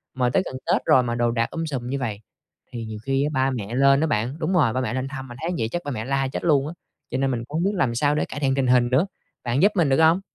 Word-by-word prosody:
mà 125 -1 +1
tới 155 - +2
gần - - -6
Tết - - +2
rồi 130 - +5
mà 120 -1 -2
đồ 120 0 +1
đạc 115 0 -1
um 165 0 -3
sùm 130 -6 -4
như 140 +1 -2
vầy. 110 -5 -3 0.5
Thì 115 -2 -5
nhiều 110 -1 -6
khi 135 +1 +1
á 150 - 0
ba 130 -1 +1
mẹ 115 -3 -4
lên 140 +1 +4
á 160 - +2
bạn, 120 0 -1
đúng 165 +3 -1
rồi, 150 -11 +3
ba 130 - -1
mẹ 120 -3 -2
lên 130 +1 -2
thăm 135 -1 -7
mà 120 - -9
thấy 165 - -1
vậy 110 - 0
chắc 175 - -2
ba 145 - -3
mẹ 110 -5 -4
la 135 +1 0
chết 130 - -5
luôn 145 -5 +3
á, - - -6 0.4
cho 130 - -2
nên 135 0 +1
mình 120 -3 -2
cũng 145 +5 -6
hông 170 - 0
biết 200 +2 +1
làm 135 -11 +1
sao 145 +4 +2
để 150 - 0
cải 145 - -7
thiện 135 -2 +1
tình 135 -1 +1
hình 125 -1 +4
nữa. 135 +9 +3 0.4
Bạn 125 +3 0
giúp 205 +2 +5
mình 170 -6 +3
được 135 +3 +3
hông? 160 +3 +5
135 Hz, 325 wpm, -23 LUFS, 120-150 Hz, 0.5 s, rồi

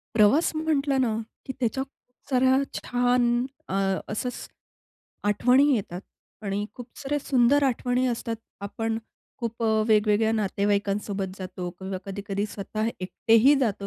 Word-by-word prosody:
प्रवास 220 +10 +5
म्हटलं 290 -3 +1
ना, 230 -3 +1 0.3
की 265 - -4
त्याच्या 260 +2 0
खूप 270 -1 -25
साऱ्या 260 0 +4 0.2
छान 245 0 +1 0.4
अ, - - -5 0.4
असचं, 250 +4 -2 1.0
आठवणी 250 +6 +4
येतात 185 -5 -3 0.4
आणि 200 0 -2
खूप 245 - -9
साऱ्या 290 0 -1
सुंदर 270 +1 +3
आठवणी 250 0 +1
असतात, 230 -2 -2 0.2
आपण 225 +2 -2 0.4
खूप 235 -1 -4
अ, - - +2 0.2
वेगवेगळ्या 215 0 +3
नातेवाईकांसोबत 200 -2 -1
जातो 185 -1 -5
किंवा 190 0 -4
कधी-कधी 200 0 -3
स्वतः 215 +2 -3
एकटेही 225 +8 +4
जातो 200 -3 -2
225 Hz, 125 wpm, -26 LUFS, 200-255 Hz, 1.0 s, प्रवास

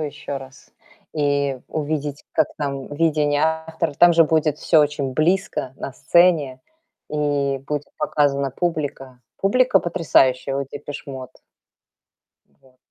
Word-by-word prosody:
еще 145 -2 -5
раз 135 0 -12 0.4
и 140 -2 0
увидеть, 150 -1 -3
как - - +2
там 140 -2 -3
видение 150 -2 +1
автор 160 0 -1
Там 175 0 +7
же 165 0 +6
будет 155 -1 +1
всё 160 -3 +4
очень 145 -3 0
близко 165 -4 0
на 135 - -6
сцене 155 -5 +3 0.5
и 145 -2 0
будет 145 0 -2
показана 140 -2 +1
публика. 140 -5 -3 0.2
Публика 250 +2 +3
потрясающая 135 -6 +2
у 140 - -1
Depeche 145 +1 -8
Mode. 130 -2 -8 1.2
Вот. 130 -1 -25
145 Hz, 120 wpm, -22 LUFS, 140-160 Hz, 1.2 s, Там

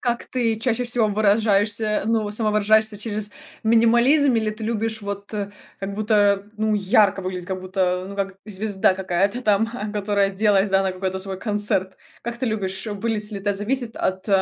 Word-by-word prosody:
как 240 -1 -1
ты 230 -4 0
чаще 245 +1 0
всего 240 -2 +2
выражаешься, 210 0 +2
ну, 220 -2 0
самовыражаешься 215 0 +2
через 210 -1 -3 0.3
минимализм, 235 +5 +4
или 220 -2 +1
ты 215 +1 -7
любишь 225 0 -2
вот, 200 0 -6 0.5
как 195 0 -5
будто 205 -2 +2
ну, 215 0 +1
ярко 200 0 +3
выглядеть, 180 -1 -5
как 185 -1 -4
будто 185 -1 -1
ну 200 - -8
как 195 -1 -3
звезда 200 -2 +1
какая-то 190 +4 0
там 215 -1 +2
а, 215 -3 -5
которая 200 -1 +1
оделась, 200 0 +2
да, 195 0 +3
на 190 - 0
какой-то 190 0 -3
свой 190 0 -5
концерт? 205 -3 -1 0.3
Как 235 0 -5
ты 255 - -1
любишь 195 -2 -2
выглядеть 210 0 -2
ли 205 - -5
это 205 +1 -1
зависит 225 +4 -2
от 190 +2 -2
210 Hz, 170 wpm, -22 LUFS, 195-220 Hz, 0.5 s, минимализм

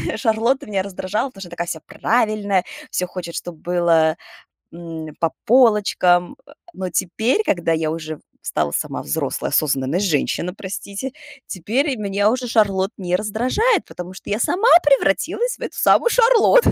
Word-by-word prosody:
Шарлотта, 235 +4 +1
меня 195 -3 -1
раздражала, 200 +6 -3
потому 195 -6 -14
что 180 - -8
такая 175 0 -4
вся 160 -2 -4
правильная, 215 -5 0 0.3
всё 180 - -1
хочет, 175 -2 -7
чтобы 175 -2 -6
было, 170 -2 +2 0.6
м, 165 -2 -8
по 165 -1 +1
полочкам. 210 -7 +3 0.4
Но 185 -1 -4
теперь, 220 - 0
когда 175 -2 0
я 160 -1 -1
уже 155 -1 -6 0.2
стала 75 - -1
сама - - -3
взрослая, 70 - -2
осознанная 140 +2 +1
женщина, 180 -1 0
простите. 200 +5 -6 0.4
Теперь 250 - -1
меня 205 0 +1
уже 255 0 -2
Шарлотт 200 -4 +2
не 180 -2 -1
раздражает, 250 - +1
потому 180 +1 -9
что 190 - -11
я 205 +1 -1
сама 385 - +2
превратилась 295 - +1
в - - -25
эту - - -5
самую 475 - +4
Шарлотту. 480 0 +5
195 Hz, 145 wpm, -20 LUFS, 175-240 Hz, 0.6 s, Шарлотту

